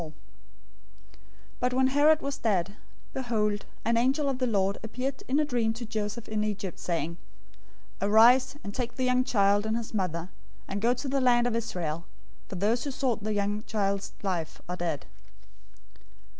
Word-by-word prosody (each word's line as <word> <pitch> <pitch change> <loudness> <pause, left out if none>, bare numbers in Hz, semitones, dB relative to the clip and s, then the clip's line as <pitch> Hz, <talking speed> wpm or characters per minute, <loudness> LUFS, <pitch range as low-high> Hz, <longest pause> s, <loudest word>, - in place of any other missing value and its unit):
"{Jeremiah 160 - -6
31:15} 155 - -17
002:019 - - -26 1.4
But 250 0 +1
when 260 0 +4
Herod 295 +3 +5
was 280 0 -2
dead, 200 -3 0 0.4
behold, 215 -5 0 0.2
an 230 +1 +3
angel 270 +4 +2
of 260 -2 -2
the 255 - +1
Lord 200 -3 +1
appeared 255 +4 -4
in 275 +3 +2
a 305 - +3
dream 235 -5 +1
to 235 +1 -6
Joseph 215 +1 -4
in 215 -1 -1
Egypt, 200 -4 -3
saying, 170 -1 -2 0.8
002:020 200 - 0
"Arise 245 +5 +6
and 200 - -6
take 240 +1 -3
the 260 - -1
young 255 0 +3
child 205 -3 +3
and 220 +1 +1
his 230 -1 -6
mother, 180 -4 -2 0.4
and 200 +1 -3
go 230 - +3
into 250 +3 0
the 270 0 +1
land 240 -1 +4
of 245 -2 0
Israel, 170 -8 -3 0.4
for - - -7
those 215 +6 +1
who 285 - -3
sought 255 -5 -1
the 215 0 -1
young 205 +1 0
child's 200 -2 -1
life 175 -5 -2
are 180 +1 -4
dead." 165 -5 -2
220 Hz, 185 wpm, -28 LUFS, 200-250 Hz, 1.4 s, Arise